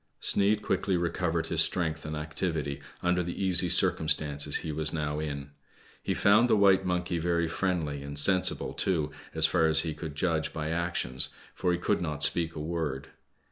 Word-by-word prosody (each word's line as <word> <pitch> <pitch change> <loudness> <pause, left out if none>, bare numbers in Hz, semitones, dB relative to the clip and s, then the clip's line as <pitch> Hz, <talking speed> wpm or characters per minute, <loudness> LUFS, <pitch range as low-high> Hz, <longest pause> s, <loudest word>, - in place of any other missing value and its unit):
Sneid 105 +1 +2
quickly 95 -3 0
recovered 85 -1 -1
his - - +1
strength 80 -4 -1
and 75 - -4
activity' 75 -2 -3 0.2
mder 90 0 +1
the 85 0 -6
easy 90 -2 +3
circumstances 80 -5 +2
he 80 - -3
was 75 0 -2
now 75 -2 -2
in. 70 -2 -5 0.5
He - - -2
found 105 +4 +4
the - - +4
white 95 -1 +4
monkey 90 -1 -1
very 85 0 0
friendly, 80 -5 -2
and 70 +1 -7
sensible 95 +5 +2
too, 80 -6 -1 0.2
as 80 0 +4
far 80 0 +2
as 80 0 +5
he 80 -1 -3
could 75 -1 -7
judge 80 -1 -1
by 80 -1 -3
actions, 85 -7 -1 0.2
for 90 - -1
he 90 - +1
could 90 - 0
not 75 -4 -3
speak 85 +1 +1
a - - -5
word. 75 -4 -4
80 Hz, 180 wpm, -28 LUFS, 75-90 Hz, 0.5 s, as